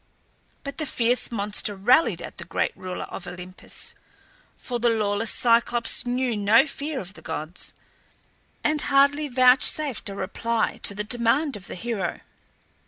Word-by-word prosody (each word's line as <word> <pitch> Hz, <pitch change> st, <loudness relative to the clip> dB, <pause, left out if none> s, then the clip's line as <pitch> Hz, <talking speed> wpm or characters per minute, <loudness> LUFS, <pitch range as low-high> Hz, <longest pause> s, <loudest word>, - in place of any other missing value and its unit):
But 280 Hz, +1 st, -7 dB
the 310 Hz, -, -2 dB
fierce 245 Hz, 0 st, +1 dB
monster 205 Hz, -1 st, -2 dB
railed 245 Hz, +11 st, +3 dB
at -, -, -9 dB
the -, -, -5 dB
great -, -, -2 dB
ruler 185 Hz, -1 st, -6 dB
of 180 Hz, -, -8 dB
Olympus 180 Hz, +1 st, -6 dB, 0.6 s
for 245 Hz, -2 st, -4 dB
the 240 Hz, +1 st, +3 dB
lawless 215 Hz, -1 st, +1 dB
Cyclops 235 Hz, 0 st, +2 dB
knew 245 Hz, -1 st, 0 dB
no 215 Hz, +6 st, +5 dB
fear 285 Hz, 0 st, -5 dB
of 195 Hz, -3 st, -9 dB
the -, -, -13 dB
gods 155 Hz, +4 st, -4 dB, 0.9 s
and 305 Hz, -1 st, +1 dB
hardly 280 Hz, +2 st, +3 dB
vouchsafed 255 Hz, 0 st, +4 dB
a 195 Hz, -, -6 dB
reply 220 Hz, +4 st, -2 dB
to 200 Hz, -, +1 dB
the 210 Hz, -, -3 dB
demand 240 Hz, +6 st, +1 dB
of 195 Hz, -2 st, -9 dB
the -, -, -6 dB
hero. 220 Hz, 0 st, -3 dB
235 Hz, 150 wpm, -24 LUFS, 205-265 Hz, 0.9 s, no